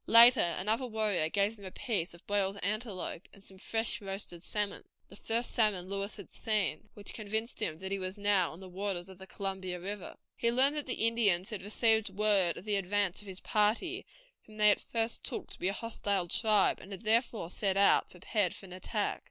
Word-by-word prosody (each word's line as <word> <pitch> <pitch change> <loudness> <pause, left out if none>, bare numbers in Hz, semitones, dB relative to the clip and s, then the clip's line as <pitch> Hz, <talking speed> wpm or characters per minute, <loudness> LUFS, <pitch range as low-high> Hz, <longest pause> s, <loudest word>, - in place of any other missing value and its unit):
Later 230 -7 +8
another 220 +7 0
warrior 215 -8 0
gave 200 +4 +1
them 200 -2 -13
a - - -5
piece 185 -4 -2
of 170 - -18
boiled 200 -1 0
antelope, 200 -4 -3
and 200 - -16
some 190 -1 -14
fresh 225 +2 -2
roasted 195 -3 -6
salmon, 205 +2 -3 0.3
the - - -13
first 230 +3 -1
salmon 210 -6 +1
Lewis 200 +1 -3
had 200 - -10
seen, 215 -3 -1
which 205 -1 -6
convinced 220 +2 -1
him 155 - -1
that 190 +2 -6
he 195 - -1
was 185 +2 -4
now 200 -4 +3
on 160 - -11
the 190 - -9
waters 185 -1 -3
of 190 -1 -12
the 190 - -10
Columbia 190 -3 -4
River. 200 +2 -6 0.2
He 235 - +1
learned 270 +4 +4
that 295 -2 -3
the 245 -3 0
Indians 205 -5 +2
had 215 - -4
received 220 +2 +2
word 195 -3 +2
of 185 - -9
the 210 -1 +1
advance 195 0 0
of 205 - -13
his 190 -1 -8
party, 235 - +1 0.4
whom 215 -1 -14
they 210 -1 +6
at - - 0
first 230 0 -1
took - - -4
to - - -3
be 180 - 0
a - - +2
hostile 200 -4 -2
tribe, 210 +2 +3
and 195 - -12
had 195 - -7
therefore 225 -5 +1
set 195 -1 0
out, 200 - +5
prepared 185 +1 -1
for - - -10
an 180 - -10
attack. 205 +3 -2
205 Hz, 210 wpm, -31 LUFS, 190-220 Hz, 0.4 s, Later